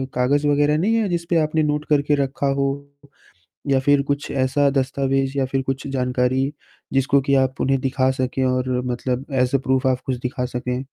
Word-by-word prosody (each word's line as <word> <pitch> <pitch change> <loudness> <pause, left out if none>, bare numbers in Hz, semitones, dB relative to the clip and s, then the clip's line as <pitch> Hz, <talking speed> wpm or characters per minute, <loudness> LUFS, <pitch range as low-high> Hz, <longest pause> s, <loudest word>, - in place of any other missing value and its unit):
कागज़ 140 +4 +2
वगैरह 145 +1 +3
नहीं 210 +8 +1
है 220 -4 +1
जिसपे 170 -1 0
आपने 155 +1 0
नोट 150 0 -1
करके 145 0 +3
रखा 135 +1 -2
हो? 140 0 +1 1.0
या 135 -1 +3
फिर 145 +1 +3
कुछ 140 +1 -3
ऐसा 140 +2 +2
दस्तावेज 135 0 0
या 135 - +1
फिर 135 0 -1
कुछ 135 +1 -4
जानकारी, 130 +1 0 0.4
जिसको 135 +1 +3
की 140 +1 +1
आप 130 0 +1
उन्हें 135 0 +2
दिखा 130 0 +1
सकें 130 0 -1
और 130 0 0 0.2
मतलब 125 +2 -2 0.2
एस 125 +2 -1
अ - - +5
प्रूफ 130 0 0
आप 130 -1 +1
कुछ 130 - -1
दिखा 125 0 -3
सकें? 125 +1 -3
135 Hz, 185 wpm, -21 LUFS, 130-145 Hz, 1.0 s, अ